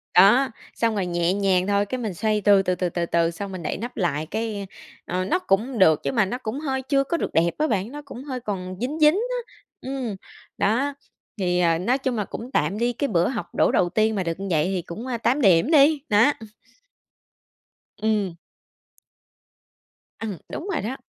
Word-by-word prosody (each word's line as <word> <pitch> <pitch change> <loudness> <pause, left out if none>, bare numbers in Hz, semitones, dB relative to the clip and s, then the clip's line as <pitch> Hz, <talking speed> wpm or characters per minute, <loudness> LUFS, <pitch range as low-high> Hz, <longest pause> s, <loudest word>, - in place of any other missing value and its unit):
Đó, 225 +9 +6 0.3
xong 230 -2 +1
rồi 195 -3 0
nhẹ 175 +1 0
nhàng 195 -2 +1
thôi, 200 0 +2
cái 255 +5 -4
mình 215 -6 -3
xoay 215 +3 0
từ, 200 -1 +5
từ, 185 -1 0
từ, 180 -1 -1
từ, 170 0 -2
từ 170 0 +1
xong 195 +3 -6
mình 180 -3 -6
đậy - - -2
nắp 240 +4 -7
lại 155 -5 0
cái, 210 +1 -4 0.4
ờ, 185 +1 -2
nó 360 - +1
cũng 235 - 0
được 160 -5 +5
nhưng - - -2
mà 210 -3 +4
nó 245 +6 -3
cũng 250 +2 -4
hơi 265 -3 -2
chưa 275 0 +2
có 335 +5 -1
được - - -3
đẹp 170 +1 +3
á 310 +1 +1
bạn, 210 +1 -1
nó 295 0 -7
cũng 260 -1 -9
hơi 260 -3 -4
còn 185 -5 -5
dính, 295 +6 -2
dính 305 +3 +6 0.2
á, 475 - -12 0.3
ừm, 260 -6 -4 0.4
đó, 260 +8 +1 0.5
thì, 180 -1 +1
ờ, 165 -2 +3
nói 245 +8 +1
chung 260 -3 -2
là 210 -2 -1
cũng 245 +3 -8
tạm 200 - 0
đi, 240 +1 +1
cái 280 +4 -1
bữa 175 -6 +2
học 190 -9 -5
đổ - - +3
đầu 175 - +2
tiên 220 +3 +1
mà 190 - 0
được 165 +2 -3
như 195 - -4
vậy 155 0 +2
thì 185 -1 -1
cũng, 220 +10 -8
ơ, 240 -2 -2
8 265 +5 +1
điểm 195 - +4
đi, 295 -1 +5
nó, 215 +7 +5
ừm. 220 -1 -11 1.5
Ừm. 205 -6 0 1.8
Ừm, 210 -6 -4
đúng 360 - -6
rồi 295 - -1
đó. 250 +6 -4
210 Hz, 215 wpm, -24 LUFS, 185-255 Hz, 1.8 s, Đó